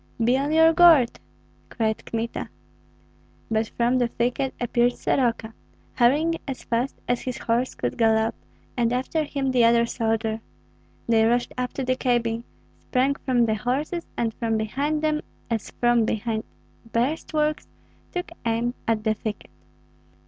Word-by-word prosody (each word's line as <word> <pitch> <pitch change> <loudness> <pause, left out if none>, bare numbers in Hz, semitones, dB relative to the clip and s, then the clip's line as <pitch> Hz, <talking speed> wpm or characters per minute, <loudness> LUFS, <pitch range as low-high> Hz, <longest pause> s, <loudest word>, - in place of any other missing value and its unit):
"Be 245 +3 +4
on 280 +3 0
your 320 +1 +6
guard!" 325 -8 +6 0.5
cried 220 -2 -1
Kmita. 230 0 -3 1.0
But 220 0 +1
from 240 +2 0
out 255 - +3
the 245 - +2
thicket 245 +3 -1
appeared 240 0 +2
Soroka, 230 -3 0 0.4
hurrying 300 +7 +3
as 270 -2 -5
fast 240 +3 -1
as 245 0 0
his 255 -2 -4
horse 240 +2 -1
could 120 - -3
gallop, 220 -1 +3 0.4
and 235 -1 +1
after 265 +5 0
him 275 -2 -2
the 250 -2 +4
other 235 0 +5
soldier. 225 -1 -1 0.7
They 225 -1 +4
rushed 240 +2 +1
up 250 0 -3
to 270 - -3
the 255 0 +1
cabin, 235 -2 0 0.3
sprang 260 +2 +1
from 255 -4 +1
the 220 - +1
horses, 270 +10 -2
and 230 -1 0
from 225 -1 -1
behind 280 +8 -1
them, 305 0 +1 0.3
as 225 -2 -2
from 240 -1 +2
behind 220 0 -2 0.5
breastworks, 300 +4 0 0.4
took 355 -1 -4
aim 235 +1 0
at 225 -2 +1
the 220 -1 +2
thicket. 215 0 -6
240 Hz, 150 wpm, -24 LUFS, 225-270 Hz, 1.0 s, your